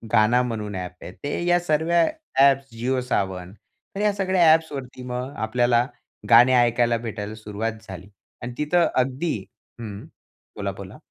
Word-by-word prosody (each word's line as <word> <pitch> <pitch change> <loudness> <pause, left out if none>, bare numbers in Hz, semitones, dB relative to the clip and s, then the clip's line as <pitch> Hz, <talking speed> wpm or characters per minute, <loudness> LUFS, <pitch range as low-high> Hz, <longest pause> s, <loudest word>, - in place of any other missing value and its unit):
Gaana 120 +4 +4
म्हणून 105 -3 -4
app 90 0 -6
आहे - - -8
ते 145 +4 -2
या 175 0 +4
सर्व्या 165 +1 +2 0.4
ॲप्स 135 -2 +4
Jio 130 +1 +1
Saavn 95 -1 -2 0.4
तर - - -4
ह्या 210 -1 +2
सगळ्या 185 -4 +3
ॲप्सवरती 135 -6 -3
मग 125 +3 -4
आपल्याला 120 +1 +2 0.4
गाणे 120 +2 +7
ऐकायला 120 0 +2
भेटायला 110 -2 -6
सुरुवात 110 +1 -4 0.2
झाली. 95 +1 -9 0.3
आणि 120 0 -6
तिथं 165 +3 +2
अगदी 135 +5 0 0.4
हं. 105 -3 -7 0.5
बोला, - - -2
बोला. - - -10
125 Hz, 145 wpm, -23 LUFS, 110-150 Hz, 0.5 s, गाणे